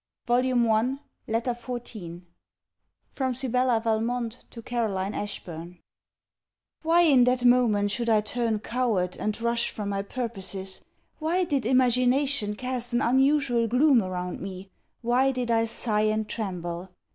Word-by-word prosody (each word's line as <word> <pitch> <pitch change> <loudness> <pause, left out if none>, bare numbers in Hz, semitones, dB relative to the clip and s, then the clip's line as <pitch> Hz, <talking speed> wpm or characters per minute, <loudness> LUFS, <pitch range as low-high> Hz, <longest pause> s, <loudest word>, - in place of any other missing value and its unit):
CLEMENT 245 0 +2
MONTGOMERY 230 +5 +1 0.3
LETTER 230 +3 0
XIV 230 -8 -7 0.9
FROM 260 -3 -2
SIBELLA 250 -2 +1
VALMONT 230 +1 -2
TO 230 - -10
CAROLINE 210 -5 -2
ASHBURN 175 -4 -6 1.0
Why 335 +2 +4
in 270 -7 +5
that 250 0 +1
moment 225 -5 +4
should 235 +1 0
I 215 -1 +4
turn 230 0 -1
coward, 220 -7 -1
and 215 +1 -2
rush 235 +1 +1
from 205 -2 -5
my 200 0 -1
purposes? 195 -4 -4 0.4
Why 335 +4 +1
did 280 -8 -1
imagination 255 -2 +3
cast 250 +1 -4
an 240 - +2
unusual 265 -2 +3
gloom 250 +2 +4
around 180 -2 -4
me? 190 0 -7 0.3
Why 250 +3 +3
did 250 -2 -2
I 225 0 +3
sigh 215 -1 0
and 215 0 -1
tremble? 180 -4 -4
235 Hz, 135 wpm, -26 LUFS, 210-250 Hz, 1.0 s, in